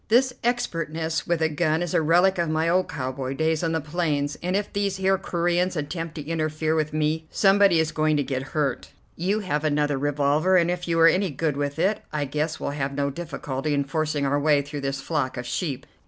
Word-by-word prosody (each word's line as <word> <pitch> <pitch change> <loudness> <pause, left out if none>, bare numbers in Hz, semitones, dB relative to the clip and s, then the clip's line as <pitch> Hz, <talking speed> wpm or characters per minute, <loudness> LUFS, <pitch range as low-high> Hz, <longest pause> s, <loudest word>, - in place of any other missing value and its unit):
This 250 +3 +3
expertness 165 -9 -1
with 170 -2 +1
a - - +4
gun 155 +1 +1
is 175 - -4
a - - +3
relic 175 +4 +3
of 170 -2 +1
my 160 +1 +1
old 185 +2 +2
cowboy 130 0 -4
days 160 +1 +1
on 165 - +1
the 160 - 0
plains, 150 -2 -1
and 180 +2 -1
if 205 0 -2
these 200 -1 0
here 190 0 +2
Coreans 175 0 0
attempt 160 +2 -4
to 150 -3 -6
interfere 155 -1 -1
with 155 -1 0
me, 155 +1 -1
somebody 195 -3 +4
is 160 -1 +1
going 155 -1 +1
to 145 - +1
get 130 -1 -2 0.2
hurt. 140 -4 -1 0.3
You 195 +6 0
have 150 -6 -2
another 145 -2 +1
revolver, 145 +5 +2
and 175 0 +3
if 180 0 -4
you 165 -1 +1
are 165 - +8
any 185 +3 +3
good 150 0 -1
with 145 +1 -2
it 195 +6 +1
I 150 -1 -1
guess 150 +3 -2
we'll - - -3
have 140 -1 -3
no 140 0 0
difficulty 145 -2 -3
in 140 - +1
forcing 150 0 -1
our 140 +1 +1
way 145 -1 +3
through 145 0 -6
this 135 0 -3
flock 140 -5 -2
of 125 - -4
sheep. 140 0 -3
155 Hz, 220 wpm, -25 LUFS, 145-175 Hz, 0.3 s, are